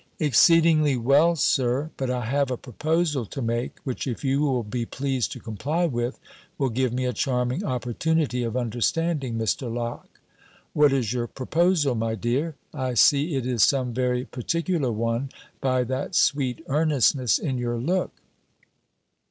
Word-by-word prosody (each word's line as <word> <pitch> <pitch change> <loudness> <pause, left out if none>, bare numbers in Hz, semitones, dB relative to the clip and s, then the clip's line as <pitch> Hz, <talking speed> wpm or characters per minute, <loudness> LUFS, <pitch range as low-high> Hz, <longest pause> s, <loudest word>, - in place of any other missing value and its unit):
"Exceedingly 155 0 +4
well, 140 +8 +4
Sir. 135 0 +1
But 130 -2 -3
I 125 -2 -2
have 140 +3 0
a 125 - -2
proposal 150 - -1
to 140 - -7
make, 115 0 -2
which, 130 0 -4
if 120 +1 -4
you 135 +2 +1
will 130 -5 +1
be 120 +3 -3
pleased 130 -5 -2
to - - -9
comply 145 - -2
with, 120 -4 -2 0.4
will 135 -2 0
give 125 +1 0
me 130 +1 -2
a 125 - -1
charming 125 - -1
opportunity 130 - -1
of 120 0 -2
understanding 125 +3 -1
Mr. 115 +2 -1
Locke." 120 0 -6 0.5
"What 150 -1 +4
is 125 -5 0
your 120 -1 -2
proposal, 160 +2 +1
my 110 -1 -1
dear? 130 - -1 0.2
I 130 -4 -3
see 145 +6 +4
it 130 -2 -2
is 125 -3 0
some 130 +1 +3
very 125 0 0
particular 165 +1 -1
one, 115 +4 -1 0.3
by 130 -1 +1
that 130 +8 -3
sweet 140 0 +1
earnestness 140 -4 +2
in 130 -5 -3
your 120 -1 -2
look." 175 +10 -1
130 Hz, 155 wpm, -25 LUFS, 120-150 Hz, 0.5 s, Exceedingly